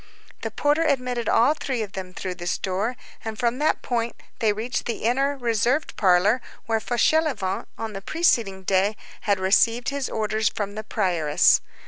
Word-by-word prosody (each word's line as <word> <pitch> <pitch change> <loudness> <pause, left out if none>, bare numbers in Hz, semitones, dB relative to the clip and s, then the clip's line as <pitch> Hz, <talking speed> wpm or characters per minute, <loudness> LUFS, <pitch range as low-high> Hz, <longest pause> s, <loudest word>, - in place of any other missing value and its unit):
The - - -3
porter 295 +2 +1
admitted 250 -6 0
all 240 +6 +4
three 260 -6 -3
of 205 - -7
them 185 -2 -6
through 185 0 -4
this 175 -1 -3
door, 200 +6 -2 0.3
and 220 -1 -5
from 240 +3 0
that 305 - +1
point 235 -1 -1 0.2
they 220 -2 +3
reached 230 +4 -3
the 235 - -3
inner, 275 +5 +1
reserved 245 +4 0
parlor 200 +5 +3 0.2
where 225 -1 +1
Fauchelevent, 240 -4 +1
on 225 -1 -5
the 195 - -6
preceding 215 - +1
day, 195 +3 +2 0.3
had 200 -1 +3
received 230 +5 +3
his 280 -1 -3
orders 215 0 0
from 205 -1 -4
the 215 +1 -5
prioress. 175 -9 +3
225 Hz, 165 wpm, -24 LUFS, 195-250 Hz, 0.3 s, all